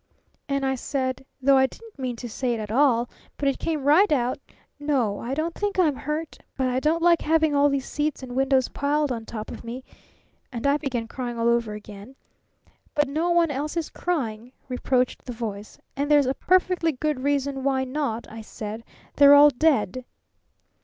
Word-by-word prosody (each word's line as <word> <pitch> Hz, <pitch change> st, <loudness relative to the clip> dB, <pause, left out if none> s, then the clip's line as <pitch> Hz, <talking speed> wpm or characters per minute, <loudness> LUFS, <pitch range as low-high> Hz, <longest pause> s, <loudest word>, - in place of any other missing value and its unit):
And 275 Hz, -1 st, 0 dB
I 265 Hz, -, +1 dB
said 260 Hz, 0 st, -3 dB, 0.2 s
though 275 Hz, 0 st, +5 dB
I 265 Hz, -, +4 dB
didn't 450 Hz, +1 st, -15 dB
mean 255 Hz, -2 st, -3 dB
to 240 Hz, +1 st, -7 dB
say 240 Hz, +1 st, -2 dB
it -, -, -5 dB
at 210 Hz, -1 st, -5 dB
all, 245 Hz, -2 st, +3 dB, 0.3 s
but 285 Hz, -, -1 dB
it 275 Hz, -, 0 dB
came 310 Hz, -4 st, -2 dB
right 310 Hz, +8 st, +5 dB
out 255 Hz, -3 st, +1 dB, 0.4 s
'N 290 Hz, +1 st, -7 dB
o, 235 Hz, -8 st, +1 dB
I 250 Hz, +3 st, -3 dB
don't 325 Hz, +3 st, -2 dB
think 410 Hz, +1 st, -3 dB
I'm 320 Hz, -6 st, +3 dB
hurt, 300 Hz, +4 st, -4 dB, 0.2 s
but 260 Hz, -1 st, +1 dB
I 255 Hz, 0 st, 0 dB
don't 320 Hz, +4 st, +1 dB
like 340 Hz, -2 st, +5 dB
having 315 Hz, -1 st, +2 dB
all 285 Hz, 0 st, +4 dB
these 275 Hz, -1 st, -1 dB
seats 295 Hz, -2 st, -2 dB
and 250 Hz, -1 st, -7 dB
windows 265 Hz, -1 st, +2 dB
piled 290 Hz, 0 st, 0 dB
on 230 Hz, -2 st, -4 dB
top 215 Hz, -2 st, -6 dB
of -, -, -9 dB
me,' 240 Hz, +3 st, -7 dB, 0.7 s
and 235 Hz, -1 st, -5 dB
I 280 Hz, +1 st, +4 dB
began 245 Hz, -6 st, -3 dB
crying 240 Hz, -1 st, -5 dB
all 230 Hz, 0 st, +1 dB
over 235 Hz, -2 st, +1 dB
again. 210 Hz, +4 st, -11 dB, 0.8 s
'But 295 Hz, -1 st, +2 dB
no 320 Hz, +5 st, 0 dB
one 340 Hz, -2 st, +3 dB
else 290 Hz, +4 st, -3 dB
is 330 Hz, -, -2 dB
crying,' 245 Hz, -8 st, -3 dB, 0.2 s
reproached 250 Hz, 0 st, 0 dB
the 250 Hz, -, -5 dB
Voice. 215 Hz, -3 st, -6 dB, 0.2 s
'And 285 Hz, +1 st, -2 dB
there's 295 Hz, -2 st, +5 dB
a 260 Hz, -, +1 dB
perfectly 365 Hz, -1 st, +2 dB
good 300 Hz, +1 st, -2 dB
reason 280 Hz, 0 st, -1 dB
why 265 Hz, -1 st, +1 dB
not,' 260 Hz, -4 st, -3 dB
I 225 Hz, 0 st, -9 dB
said. 215 Hz, +1 st, -7 dB, 0.3 s
'They're 285 Hz, 0 st, +8 dB
all 290 Hz, +1 st, +8 dB
dead!' 255 Hz, -5 st, +1 dB
270 Hz, 195 wpm, -25 LUFS, 245-300 Hz, 0.8 s, They're